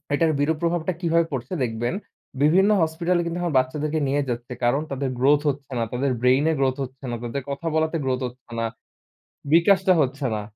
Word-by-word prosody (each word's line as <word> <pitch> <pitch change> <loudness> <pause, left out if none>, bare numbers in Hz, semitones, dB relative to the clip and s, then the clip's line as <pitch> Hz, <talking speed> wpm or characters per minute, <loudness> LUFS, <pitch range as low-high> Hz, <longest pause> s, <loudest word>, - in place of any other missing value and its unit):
এটার 160 +1 +2
বিরূপ 155 +2 +1
প্রভাবটা 170 +1 0
কিভাবে 170 -1 +2
পড়ছে 130 +5 -4
দেখবেন। 120 +2 -2 0.5
বিভিন্ন 185 +7 +5
হসপিটালে 170 +2 +1
কিন্তু 170 0 -3
এখন 170 -4 -1
বাচ্চাদেরকে 150 +4 -1
নিয়ে 145 +2 +1
যাচ্ছে। 120 +1 -4
কারণ 130 +5 +2
তাদের 135 0 -2
গ্রোথ 145 +3 +4
হচ্ছে 140 -1 -5
না। 115 - +1
তাদের 130 +2 0
ব্রেইনে 130 +5 +4
গ্রোথ 130 -1 +2
হচ্ছে 130 +1 -9
না। - - -2
তাদের 130 +3 -4
কথা 140 +4 -4
বলাতে 160 +1 +1
গ্রোথ 130 0 0
হচ্ছে 125 0 -15
না। 115 - 0 0.9
বিকাশটা 190 +2 +5
হচ্ছে 135 0 -1
না। 105 - -3
145 Hz, 180 wpm, -24 LUFS, 130-165 Hz, 0.9 s, বিভিন্ন